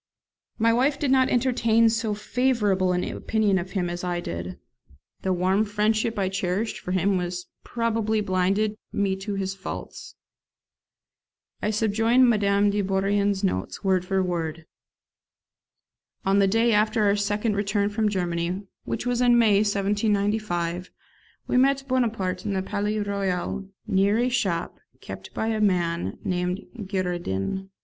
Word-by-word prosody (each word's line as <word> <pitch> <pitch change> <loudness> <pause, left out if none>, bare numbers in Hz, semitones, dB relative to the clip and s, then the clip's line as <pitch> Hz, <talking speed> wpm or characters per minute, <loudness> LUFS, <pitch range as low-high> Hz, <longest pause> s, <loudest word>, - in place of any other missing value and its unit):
My 230 0 +3
wife 270 +4 +2
did 280 -3 0
not 260 -1 +4
entertain 230 -2 +3
so 225 -1 0
favourable 210 -4 +1
an 180 0 0
opinion 210 -3 0
of 185 +1 -7
him 185 -3 0
as 175 +1 -5
I 175 -1 -1
did; 85 - -5 0.6
the 190 - -1
warm 185 +3 +2
friendship 215 +2 0
I 195 -2 +1
cherished 190 +3 -2
for 180 - -6
him 185 0 +1 0.4
probably 225 -2 0
blinded 200 +2 0
me 195 -1 0
to 200 +1 -4
his 195 -1 -2
faults. 195 0 -8 1.5
I 210 - 0
subjoin 225 +4 +3
Madame 205 -2 +3
de 205 0 0
Bourrienne's 200 +1 +1
notes, 95 - -2
word 190 -2 +2
for 190 +1 0
word: 165 -3 -3 1.6
On 195 +1 +3
the 200 - +4
day 225 +3 +3
after 215 +1 +2
our 200 0 +3
second 205 +1 0
return 200 0 0
from 215 0 +1
Germany, 175 0 -2 0.2
which - - -3
was 245 0 0
in 245 -1 +5
May 220 -4 +5
1795, 200 -3 0 0.6
we - - 0
met 270 +1 +3
Bonaparte 225 -8 0
in 205 - -2
the 190 -1 -1
Palais 210 +2 -2
Royal, 195 -1 -2 0.2
near 200 +2 +2
a 245 +2 +2
shop 190 -9 -1 0.2
kept - - -9
by 220 - -1
a 220 -1 -1
man 175 -4 0
named 180 +1 -2 0.2
Girardin. 180 - -2
200 Hz, 140 wpm, -25 LUFS, 185-220 Hz, 1.6 s, in